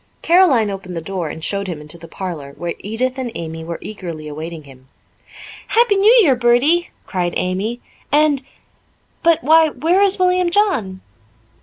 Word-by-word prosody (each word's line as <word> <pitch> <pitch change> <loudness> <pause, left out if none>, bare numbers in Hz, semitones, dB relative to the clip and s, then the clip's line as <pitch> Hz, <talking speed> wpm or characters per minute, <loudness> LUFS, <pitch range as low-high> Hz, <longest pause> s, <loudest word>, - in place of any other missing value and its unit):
Caroline 320 - +4
opened 185 -2 -7
the - - -2
door 175 -1 -4
and 160 - -8
showed 200 +2 -1
him 170 -4 -5
into 150 +2 -2
the 165 0 -12
parlour, 160 -6 -7
where 170 0 -3
Edith 255 +5 -2
and 250 -2 -3
Amy 160 -1 -6
were 170 +1 -5
eagerly 170 -7 -7
awaiting 155 +2 -7
him. 130 -2 -17 0.8
"Happy 460 -2 +3
New 400 +3 +5
Year, 275 -7 +4
Bertie," 250 +9 +2 0.2
cried 175 -2 -2
Amy. 200 +6 -2 0.3
"And 295 -2 +3 0.8
but, 335 -4 +3
why, 320 +3 +5
where 340 +6 +1
is 400 0 +4
William 365 -1 +2
John?" 290 - 0
210 Hz, 160 wpm, -18 LUFS, -, 0.8 s, New